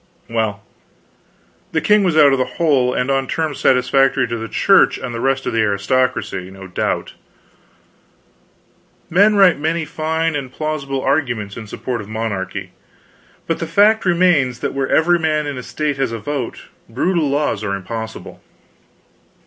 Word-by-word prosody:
Well, 110 -3 -2 1.1
the 160 - +2
king 210 +6 +3
was 175 -4 +1
out 145 -2 +7
of 135 - +1
the 130 0 -2
hole; 140 -7 +2
and 125 +2 -1
on 135 -1 0
terms 155 -3 -2
satisfactory 130 0 +3
to 115 - -2
the 115 -1 -5
Church - - +4
and 120 - -6
the 115 - -4
rest 135 0 0
of - - -2
the 115 - +2
aristocracy, 105 -2 0
no 95 0 -11
doubt. 90 - -2 2.0
Men 205 +5 +5
write 190 -6 +5
many 160 +2 -1
fine 160 +1 -1
and 135 -3 -4
plausible 140 -3 -3
arguments 120 -8 -1
in 110 -2 -8
support 120 +2 -4
of 105 - -11
monarchy, 110 -4 -4 0.7
but 165 - -2
the 165 - -3
fact 210 +6 +4
remains 170 -9 +2
that - - -2
where 135 -1 -2
every 175 +2 +3
man 155 -2 0
in 145 -1 -4
a 125 - -5
State 150 +2 -3
has 135 -3 -1
a 115 - -3
vote, 135 +1 -5 0.3
brutal 155 +6 0
laws 140 -7 -1
are 100 -2 -1
impossible. 110 +3 -7
135 Hz, 160 wpm, -18 LUFS, 115-160 Hz, 2.0 s, out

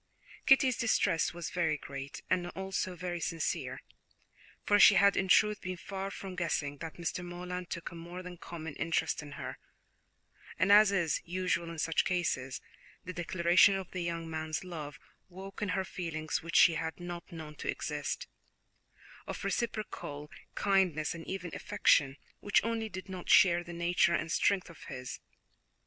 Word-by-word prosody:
Kitty's 265 -2 +5
distress 220 -8 +2
was 170 -1 -6
very 160 -4 +1
great, 140 0 -8
and 180 -1 +1
also 190 -1 -2
very 175 0 -4
sincere, 165 -1 -2 0.8
for 205 0 +4
she 200 - +9
had 200 +1 +5
in 190 - +1
truth 210 +2 +4
been 185 -1 -4
far 195 +1 -5
from 195 -1 -7
guessing 155 -5 -1
that 165 -1 -6
Mr. 175 +1 -3
Morland 180 0 -6
took 170 - -5
a - - -11
more 175 +2 -8
than 180 -1 -8
common 160 -2 -7
interest 165 -1 0
in 145 -1 -10
her, - - -6 1.0
and 185 +5 +3
as 210 0 +8
is 175 -5 +1
usual 175 -1 -1
in 170 - -7
such 165 +1 +1
cases, 135 -8 -1 0.4
the 185 - -5
declaration 175 +2 +4
of 190 -2 -5
the 185 - -3
young 170 -1 -3
man's 160 +1 -3
love 155 -5 -7 0.3
woke 190 +3 -9
in 210 - -1
her 190 +1 0
feelings 160 -4 -3
which 170 +1 -6
she 170 - +8
had 160 +1 -3
not 175 -1 -7
known 160 -3 -8
to - - -5
exist, - - -3 1.0
of - - -5
reciprocal 170 -10 -3 0.2
kindness 185 -6 +2
and 165 -1 -9
even 180 -3 -5
affection, 140 -1 +2 0.2
which 205 - +3
only 225 0 -1
did 185 -1 -7
not 185 -2 -7
share 175 -2 +6
the 175 - -9
nature 170 0 +2
and 165 - -2
strength 195 +1 +2
of 170 -3 -13
his. 125 -2 -6
175 Hz, 165 wpm, -32 LUFS, 165-190 Hz, 1.0 s, she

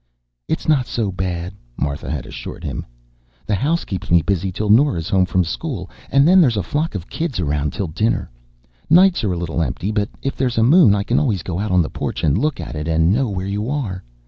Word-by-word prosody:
"It's - - -2
not 140 -6 +3
so 110 -5 -1
bad," 90 -1 -3 0.2
Martha 70 -1 -3
had 75 -3 -3
assured - - -8
him. - - -5 0.6
"The 75 - -1
house 150 - 0
keeps 95 0 -5
me 85 -1 +4
busy 95 +2 -1
till 105 +3 -1
Nora's 110 - +3
home 95 -1 +3
from 95 0 +2
school, 95 - -5 0.2
and 140 +2 +4
then 185 +1 +7
there's 125 -9 +3
a 100 - 0
flock 150 -3 -2
of 90 -3 -5
kids 160 - -3
around 75 -2 -1
till 100 - -3
dinner. 105 +8 -1 0.6
Nights 180 0 +5
are 105 - +1
a - - -3
little 85 -1 -2
empty, 90 +5 -2
but 105 0 0
if 135 - -2
there's 125 -3 -1
a 110 - +4
moon, 140 - +6
I 100 - 0
can 120 +4 +1
always 105 - 0
go 90 -1 -3
out 105 +2 -2
on 90 -2 +3
the - - -4
porch - - -4
and 75 -3 +3
look 150 +8 0
at - - -6
it 75 +1 -4
and 80 +2 +3
know 130 +1 +1
where 95 -2 -3
you 105 +4 -2
are. 115 -11 -3
100 Hz, 230 wpm, -20 LUFS, 85-130 Hz, 0.6 s, then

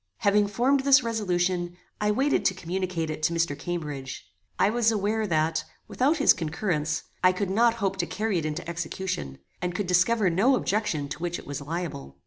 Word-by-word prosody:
Having 205 0 +3
formed 250 +7 +2
this 270 -1 +5
resolution, 180 -5 -1 0.2
I 210 - +1
waited 270 +7 +2
to 190 - +3
communicate 180 -2 -3
it 155 - -6
to 155 +2 +1
Mr. 165 -3 0
Cambridge. 145 -4 -5 0.3
I 200 - +3
was 230 -1 +3
aware 215 +1 0
that, 160 -2 +1 0.2
without 285 +6 +1
his 290 - +6
concurrence, 160 -2 -2 0.2
I 185 - +7
could 185 +1 -2
not 230 +3 +3
hope 195 -4 -1
to 175 -2 -1
carry 215 -3 -1
it 155 - -4
into 160 +3 -5
execution, 165 - -4 0.2
and 180 -1 -2
could 205 - -1
discover 180 +3 +3
no 225 +11 +4
objection 195 - -1
to - - -6
which 175 0 -2
it - - -11
was 145 0 -5
liable. 145 - -5
180 Hz, 185 wpm, -26 LUFS, 165-210 Hz, 0.3 s, I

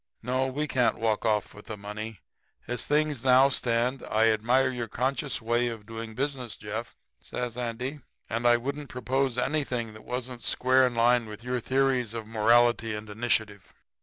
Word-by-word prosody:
No, 130 +1 0
we 145 +4 -2
can't 125 -4 +2
walk 110 0 0
off 105 -1 0
with 105 - -14
the 110 - -5
money 105 0 -7 0.5
as 120 -1 -3
things 150 -4 +1
now 130 +1 +6
stand. 125 0 0
I 110 +1 +4
admire 125 +5 +2
your 120 -2 -4
conscious 135 +4 -1
way 120 +2 +1
of 115 -3 -6
doing 115 0 -7
business, 130 -3 -2
Jeff,' 110 +3 -6 0.2
says 125 -2 -5
Andy, 125 +4 -4 0.3
'and 115 +2 0
I 120 0 +6
wouldn't 140 +4 -5
propose 130 0 -1
anything 125 -4 -1
that 110 - -13
wasn't 125 0 -5
square 130 +2 +3
in 120 - -5
line 120 0 +3
with 105 +2 -9
your 125 0 -1
theories 130 -2 +1
of 115 -2 -4
morality 115 +1 +3
and 105 0 -7
initiative. 105 -3 -1
120 Hz, 170 wpm, -28 LUFS, 110-130 Hz, 0.5 s, now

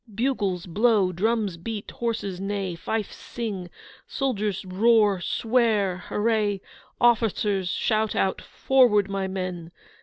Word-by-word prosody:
bugles 205 -7 -1
blow; 205 +1 +2
drums 205 0 0
beat; 205 +4 -6
horses 225 -6 -3
neigh; 195 -2 -2
fifes 210 +5 -3
sing; 200 -7 -5 0.4
soldiers 210 -8 -2
roar, 205 0 +3
swear, 220 -3 +1
hurray; 210 +1 0 0.4
officers 210 -5 +2
shout 215 +3 0
out 190 - 0
'Forward, 240 -7 +3
my 195 -1 -1
men! 185 -3 -5
205 Hz, 110 wpm, -25 LUFS, 190-225 Hz, 0.4 s, roar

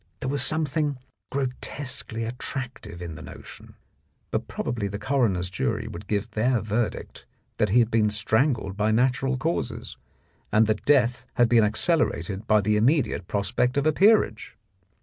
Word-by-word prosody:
There 130 - -2
was 140 -1 0
something 150 -1 0 0.3
gro 140 0 0 0.2
tesquely 125 -5 -4
attractive 120 -6 -6
in 85 -2 -6
the 75 - -10
notion, - - -12 0.6
but - - -2
probably 115 -4 -3
the 100 +1 -5
coroner's 105 -6 0
jury 95 - -2
would 90 +4 -8
give 105 +2 -2
their 115 +3 +1
verdict 110 +3 -3 0.3
that 105 - +2
he 110 - +3
had 120 -1 +4
been 110 -1 +3
strangled 110 0 +1
by 105 +1 +1
natural 130 +4 +1
causes, 120 -6 -3 0.5
and 110 +1 +5
that 110 0 -1
death 125 -3 +3
had 120 - +4
been 115 -1 +5
accelerated 105 - 0
by 110 -1 +4
the 105 +1 +1
immediate 115 - +1
prospect 120 +6 0
of 140 - +1
a 155 - +5
peerage. 195 - +3
115 Hz, 155 wpm, -25 LUFS, 105-135 Hz, 0.6 s, and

